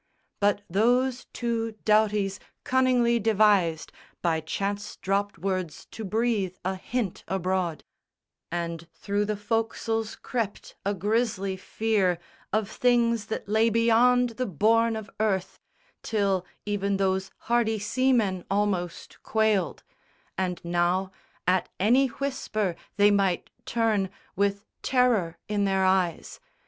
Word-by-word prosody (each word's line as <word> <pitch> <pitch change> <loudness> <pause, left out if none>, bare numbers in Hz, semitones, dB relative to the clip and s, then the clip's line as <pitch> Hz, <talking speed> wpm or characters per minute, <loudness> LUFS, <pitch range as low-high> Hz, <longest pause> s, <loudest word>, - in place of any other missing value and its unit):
But 205 0 +2
those 245 +7 +2
two 230 -2 -2
Doughtys 210 -2 +2 0.2
cunningly 250 -2 +3
devised 205 -7 +3 0.3
By 165 -2 +2
chance 200 +6 -3
dropt 200 +2 -1
words 185 -3 -3
to 220 - -7
breathe 215 -3 0
a 190 - +1
hint 210 0 -3
abroad; 185 -2 -1 0.7
And 170 -1 -3
through 205 +4 -1
the 210 0 -1
foc'sles 225 0 -1
crept 225 -5 -4
a 200 +1 0
grisly 205 -1 0
fear 195 -2 0 0.3
Of 215 0 +1
things 235 -2 +2
that 220 - -4
lay 220 +2 +3
beyond 235 +2 +4
the 255 - +1
bourne 225 +6 +3
of 220 -1 -5
earth, 195 -4 0 0.4
Till 195 -4 0 0.2
even 200 -1 0
those 190 0 0
hardy 230 -2 +1
seamen 215 -4 +1
almost 195 -4 -2
quailed; 215 -6 +1 0.5
And 180 -2 -1
now, 175 +2 +1 0.3
at 185 +1 +2
any 245 +8 +4
whisper, 230 -8 -2 0.2
they 205 0 +6
might 195 -3 +1 0.2
turn 225 -6 +1 0.3
With 200 +1 0 0.2
terror 235 -10 +2
in 205 -1 0
their 190 -1 +2
eyes. 185 -3 0
205 Hz, 115 wpm, -27 LUFS, 190-225 Hz, 0.7 s, they